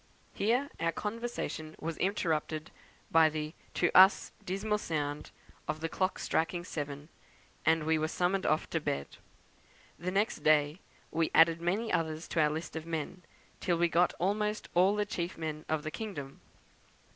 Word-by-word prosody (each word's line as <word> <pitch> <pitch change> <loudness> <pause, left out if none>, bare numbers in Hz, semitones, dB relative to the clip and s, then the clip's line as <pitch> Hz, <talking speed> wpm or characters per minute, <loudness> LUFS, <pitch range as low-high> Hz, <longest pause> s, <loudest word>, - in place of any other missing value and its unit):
Here 245 +7 +1
our 165 0 +1
conversation 210 -6 -4
was 165 +1 -3
interrupted 160 -5 -1 0.4
by 160 -1 +6
the, 155 0 -4 0.2
to 175 - +1
us, 190 +2 +7
dismal 210 +3 -1
sound 150 -5 -3 0.4
of 155 0 -2
the 165 +1 -2
clock 185 +2 0
striking 170 +2 0
seven, 145 -3 -5 0.6
and 160 -1 +4
we 160 0 +2
were 155 - +1
summoned 185 +4 0
off 155 +1 +2
to 165 - +1
bed. 70 - -3 0.8
The 180 - -2
next 200 +4 +1
day 150 +2 +3 0.3
we 165 0 +1
added 165 0 +6
many 200 +7 0
others 160 0 -1
to 165 - +2
our 150 - +4
list 155 +1 -5
of 160 0 -5
men, 165 +2 -4 0.4
till 175 -2 +1
we 170 0 +3
got 175 +2 +3
almost 210 +3 -1
all 185 +4 +4
the 210 0 +1
chief 175 -3 -3
men 155 -1 -4
of 155 -1 0
the 155 - -4
kingdom. 155 -12 -6
165 Hz, 160 wpm, -31 LUFS, 155-190 Hz, 0.8 s, us